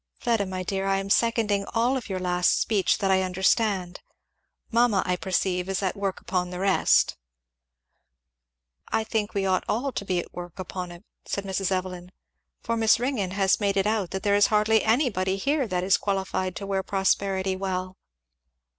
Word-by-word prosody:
Fleda 225 -5 0
my 185 0 -4
dear, 195 +1 -2
I 195 0 +2
am 195 0 -3
seconding 220 -4 +2
all 240 +4 +2
of 250 -5 -5
your 190 - -2
last 180 -1 +2
speech 210 -4 +1
that 195 -2 0
I 190 0 +4
understand. 190 0 0 0.7
Mamma, 230 -4 +3
I 180 -1 +1
perceive, 180 0 -1
is 195 +1 -1
at 185 - 0
work 200 -1 -3
upon 180 -1 -2
the 180 - -6
rest." 195 +1 +3 1.7
"I 220 - 0
think 220 -1 -2
we 195 -1 0
ought 185 -1 +1
all 260 +6 0
to 215 - -4
be 185 -2 -1
at 175 - -4
work 175 -1 -8
upon 180 -1 -5
it," 175 +2 -12 0.2
said 200 - -2
Mrs. 195 0 -2
Evelyn, 185 -1 -3 0.5
"for 230 - -1
Miss 225 0 +4
Ringgan 235 -8 -1
has 195 -1 +3
made 200 -2 0
it 195 - +2
out 210 -4 0
that 190 - -5
there 205 - +2
is 205 0 +5
hardly 215 +1 +3
anybody 220 -6 +1
here 275 +5 0
that 180 -2 -1
is 190 +1 +4
qualified 190 -2 -2
to 200 - -5
wear 195 -1 -1
prosperity 190 0 0
well." 185 -1 -3
195 Hz, 180 wpm, -26 LUFS, 185-210 Hz, 1.7 s, is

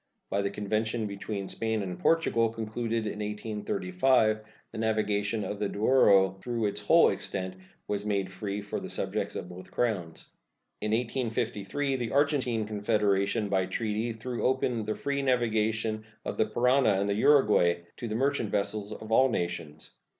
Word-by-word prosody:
By 100 - +1
the 100 - 0
convention 110 +3 -1
between 100 -1 -4
Spain 110 0 -1
and 90 -2 -5
Portugal 115 -9 +3
concluded 115 0 -3
in 105 0 -4
1835 105 +1 +1 0.3
the - - -6
navigation 105 -1 0
of 105 - -4
the 105 - 0
Douro 100 -4 +4
throughout 115 -2 -1
its 100 +1 -2
whole 165 +11 +6
extent 95 -1 -4 0.3
was 100 -1 -2
made 100 -3 -1
free 100 +2 -4
for 105 - -4
the - - -7
subjects - - -2
of - - -4
both 90 +1 -10
Crowns. 95 -9 -2 0.5
In 105 - -1
1853 120 +2 -1
the 120 -3 -3
Argentine 135 -6 +2
Confederation 105 0 +1
by 95 -2 +1
treaty 110 +3 -1
threw 115 +2 -5
open 125 -2 +1
the 110 - -2
free 140 0 -2
navigation 110 -4 +1 0.2
of - - -3
the 110 - +3
Parana 125 +1 +3
and 100 +1 0
the 100 - +1
Uruguay 105 -8 +4 0.2
to 120 - -5
the 110 - -3
merchant 135 -2 +1
vessels 100 +1 -1
of 110 +1 -8
all 130 +4 +5
nations. 80 -7 -4
110 Hz, 155 wpm, -29 LUFS, 100-120 Hz, 0.5 s, whole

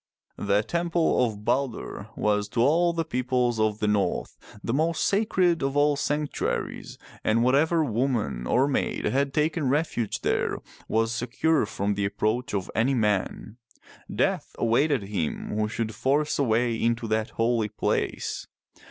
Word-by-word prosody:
The 100 +1 +2
temple 170 0 +1
of 105 -3 -3
Balder 130 -6 -2
was 105 -1 +1
to 115 - 0
all 165 +7 +4
the 165 -1 -2
peoples 125 -4 0
of 110 -1 +1
the 105 - -1
north 105 -2 0 0.3
the 115 - -1
most 160 +4 +1
sacred 185 -5 +2
of 135 +1 -1
all 145 0 +4
sanctuaries, 145 +1 -2 0.3
and 115 +2 +2
whatever 155 +6 +3
woman 115 - -1
or 130 +2 +3
maid 145 - -1
had 140 +1 +1
taken 150 -1 0
refuge 140 -6 -1
there - - 0 0.3
was 115 +1 +1
secure 125 +7 +1
from 100 +1 -1
the 100 0 -1
approach 110 +4 -1
of 95 -2 -3
any 130 +4 +2
man. 105 0 -1 0.5
Death - - -1
awaited 125 +2 +2
him 95 -6 -3
who 105 0 +1
should 110 0 -3
force 145 +6 0
a - - +4
way 120 0 +2
into 115 +1 0
that 110 0 0
holy 115 -1 +1
place. 105 - -2
120 Hz, 150 wpm, -26 LUFS, 110-145 Hz, 0.5 s, all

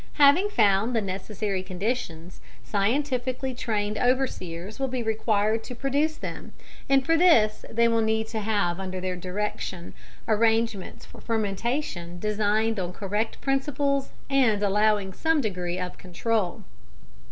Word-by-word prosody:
Having 295 +8 +5
found 210 - +3
the - - +4
necessary 195 0 -3
conditions, 185 -3 -4 0.2
scientifically 255 +4 0
trained 215 -4 -2
overseers 215 -7 -1
will 270 - 0
be 255 -2 -2
required 220 0 +1
to 250 - -7
produce 285 +5 0
them, - - -7 0.4
and 270 -1 +4
for 330 - +4
this 320 -12 +4
they 235 +1 +3
will 230 -1 +2
need 220 0 +1
to 225 - -3
have 200 -5 0
under 185 -1 -4
their 185 0 -2
direction 185 -1 -4 0.3
arrangements 225 -2 +1
for - - -14
fermentation 210 - -2
designed 215 +2 +1
on 180 -1 -3
correct 210 +3 -2
principles 275 0 0 0.2
and 250 -7 +3
allowing 205 -1 +2
some 320 - +1
degree 180 -7 -2
of 180 -1 -5
control. 185 +1 -1
220 Hz, 130 wpm, -26 LUFS, 195-255 Hz, 0.4 s, Having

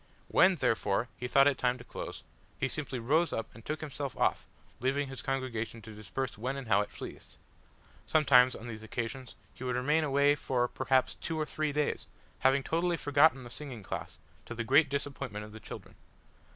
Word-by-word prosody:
When, 185 0 +6
therefore, 115 - +1
he 125 - -4
thought 135 +2 +6
it 140 -2 +3
time 125 0 +2
to 120 - -11
close, - - -7 0.4
he 135 - +1
simply 135 -2 -4
rose 155 +9 +2
up 115 - -4
and 115 - -13
took 155 +4 -4
himself 145 -3 -4
off, - - +1 0.3
leaving 135 +3 0
his 135 - -7
congregation 125 -4 -3
to 110 - -9
disperse 110 +3 -4
when 130 +4 -2
and 135 -3 -6
how 100 -2 +4
it 105 - -4
pleased! - - -9 0.7
Sometimes 130 -5 +5
on 115 - -8
these 110 -2 -6
occasions 115 +3 -5 0.2
he - - -10
would 125 -1 -1
remain 150 +6 +2
away 140 0 +4
for, 125 -4 0
perhaps, 130 +1 +1
two 160 -1 -4
or 155 - 0
three 155 0 -1
days, 150 0 -1 0.3
having 135 +1 +3
totally 170 +3 +1
forgotten 145 -2 +4
the 120 - -10
singing 125 -5 -7
class, - - -6 0.3
to 120 - -6
the 115 - -2
great 140 +5 +5
disappointment 140 -6 -3
of 105 - -12
the 110 - -10
children. - - -9
130 Hz, 190 wpm, -31 LUFS, 120-145 Hz, 0.7 s, When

